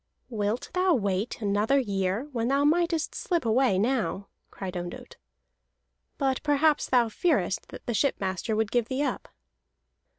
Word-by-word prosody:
"Wilt 215 Hz, 0 st, -2 dB
thou 365 Hz, -1 st, +3 dB
wait 200 Hz, -1 st, -1 dB
another 210 Hz, +6 st, +2 dB
year 200 Hz, 0 st, -1 dB
when 230 Hz, -3 st, -1 dB
thou 275 Hz, +2 st, +2 dB
mightest 330 Hz, +1 st, +1 dB
slip 340 Hz, -6 st, -1 dB
away 230 Hz, -3 st, +3 dB
now?" 215 Hz, -2 st, -1 dB, 0.2 s
cried 190 Hz, -2 st, -7 dB
Ondott. 175 Hz, 0 st, -7 dB, 1.0 s
"But 270 Hz, -2 st, 0 dB
perhaps 295 Hz, +1 st, +2 dB
thou 245 Hz, -2 st, +4 dB
fearest 220 Hz, -, 0 dB
that -, -, -11 dB
the 240 Hz, -, -2 dB
shipmaster 205 Hz, -4 st, 0 dB
would 220 Hz, -1 st, 0 dB
give 240 Hz, -2 st, +1 dB
thee 265 Hz, +3 st, -1 dB
up." -, -, -3 dB
235 Hz, 140 wpm, -27 LUFS, 205-280 Hz, 1.0 s, thou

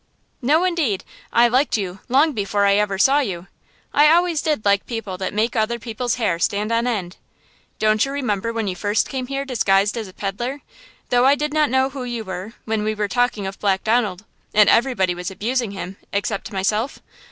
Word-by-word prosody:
"No, 300 Hz, +7 st, +3 dB
indeed! 325 Hz, -, 0 dB, 0.3 s
I 235 Hz, +1 st, +5 dB
liked 255 Hz, +1 st, +2 dB
you, 190 Hz, -2 st, -4 dB
long 285 Hz, +5 st, +4 dB
before 200 Hz, -2 st, 0 dB
I 200 Hz, -, +4 dB
ever 205 Hz, -2 st, 0 dB
saw 270 Hz, +8 st, +4 dB
you! 185 Hz, -10 st, -3 dB, 0.5 s
I 295 Hz, +1 st, +6 dB
always 340 Hz, -1 st, +3 dB
did 300 Hz, -9 st, -1 dB
like 200 Hz, 0 st, +2 dB
people 225 Hz, -5 st, -4 dB
that 190 Hz, -, -2 dB
make 220 Hz, +4 st, 0 dB
other 225 Hz, +1 st, +1 dB
people's 235 Hz, +2 st, -3 dB
hair 205 Hz, -9 st, 0 dB
stand 205 Hz, +5 st, 0 dB
on 230 Hz, +1 st, +1 dB
end! 195 Hz, -7 st, -3 dB, 0.6 s
Don't 215 Hz, 0 st, +3 dB
you 275 Hz, -, -2 dB
remember 230 Hz, -6 st, -1 dB
when 225 Hz, -2 st, -2 dB
you 185 Hz, -, -2 dB
first 205 Hz, +3 st, 0 dB
came 260 Hz, -2 st, -4 dB
here 275 Hz, +1 st, -3 dB
disguised 205 Hz, -5 st, +2 dB
as 225 Hz, -3 st, -4 dB
a 185 Hz, -, -13 dB
peddler, 240 Hz, +9 st, -4 dB, 0.5 s
though 245 Hz, +1 st, +4 dB
I 280 Hz, -, +6 dB
did 300 Hz, +1 st, -2 dB
not 305 Hz, -1 st, +3 dB
know 265 Hz, +2 st, +2 dB
who 265 Hz, -2 st, -6 dB
you 240 Hz, -2 st, -4 dB
were, 190 Hz, +2 st, -6 dB
when 220 Hz, -1 st, -1 dB
we 215 Hz, 0 st, -1 dB
were 210 Hz, -1 st, -1 dB
talking 245 Hz, -2 st, 0 dB
of 195 Hz, 0 st, -6 dB
Black 195 Hz, -2 st, +1 dB
Donald, 215 Hz, -4 st, 0 dB, 0.3 s
and 210 Hz, -1 st, +6 dB
everybody 230 Hz, -7 st, +2 dB
was 180 Hz, 0 st, -5 dB
abusing 230 Hz, +5 st, -2 dB
him, 195 Hz, -1 st, -7 dB
except 200 Hz, 0 st, -2 dB
myself? 210 Hz, +6 st, -1 dB
220 Hz, 200 wpm, -21 LUFS, 200-255 Hz, 0.6 s, I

